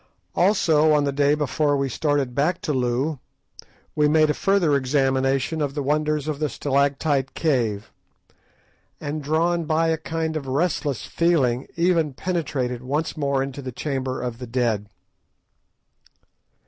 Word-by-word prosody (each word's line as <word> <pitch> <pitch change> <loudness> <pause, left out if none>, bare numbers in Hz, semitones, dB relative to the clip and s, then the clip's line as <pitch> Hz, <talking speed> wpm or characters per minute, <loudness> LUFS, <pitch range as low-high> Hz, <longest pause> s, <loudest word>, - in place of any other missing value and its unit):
Also, 160 -5 +3
on 150 -1 +3
the 140 - 0
day 145 +1 +2
before 150 0 0
we 135 0 0
started 140 -1 0
back 155 +7 +1
to 150 - -2
Loo, 130 +3 0 0.8
we 150 -1 +3
made 155 0 +4
a - - 0
further 185 -6 +2
examination 135 +2 +1
of 140 -1 -2
the 145 - -2
wonders 150 +1 0
of 150 -2 -3
the 155 -1 0
stalactite 140 0 0
cave, 115 -10 0 1.1
and, 150 +1 -4
drawn 165 +3 +1
by 160 +1 +1
a 160 -1 0
kind 160 0 -3
of 145 -3 -4
restless 145 -1 -1
feeling, 140 -8 +1
even 170 -5 +1
penetrated 130 -6 -2
once 145 +5 -2
more 140 -3 0
into 135 +1 -6
the 130 -1 -6
Chamber 130 0 -3
of 120 -2 -4
the 125 - -7
Dead. 115 -4 0
145 Hz, 145 wpm, -23 LUFS, 135-155 Hz, 1.1 s, made